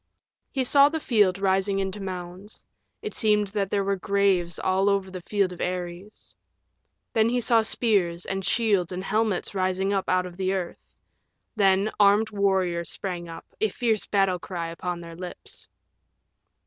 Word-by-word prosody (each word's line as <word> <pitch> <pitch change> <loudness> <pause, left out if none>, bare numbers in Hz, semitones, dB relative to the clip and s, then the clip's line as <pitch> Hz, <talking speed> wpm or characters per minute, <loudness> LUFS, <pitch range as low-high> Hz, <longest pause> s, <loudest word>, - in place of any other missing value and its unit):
He 265 - -1
saw 280 +3 +5
the 320 +1 -3
field 205 -9 +2
rising 195 0 +1
into 195 +1 -2
mounds. 185 +2 -7 0.4
It 430 - -4
seemed 210 -2 +2
that 200 -1 -2
there 200 0 0
were 200 0 0
graves 190 -3 +1
all 190 +2 +1
over 195 -1 0
the 185 -1 -7
field 195 0 0
of 175 - -9
Ares. 180 +3 -5 0.8
Then 220 0 +3
he 245 +1 +1
saw 230 -1 +3
spears 195 -7 0
and 195 0 -3
shields 200 -4 +1
and 185 +1 -4
helmets 210 -1 0
rising 190 +1 0
up 195 -1 -1
out 185 0 +2
of 180 -1 -9
the 190 0 0
earth. 180 -3 -4 0.8
Then 195 0 +3
armed 205 +2 +4
warriors 190 -4 0
sprang 175 -3 -4
up, 165 - -9 0.2
a 220 - +3
fierce 220 0 -1
battle 195 -3 +2
cry 170 -3 -5
upon 175 +1 -4
their 170 -1 -10
lips. 180 +1 -9
195 Hz, 160 wpm, -25 LUFS, 180-210 Hz, 0.8 s, saw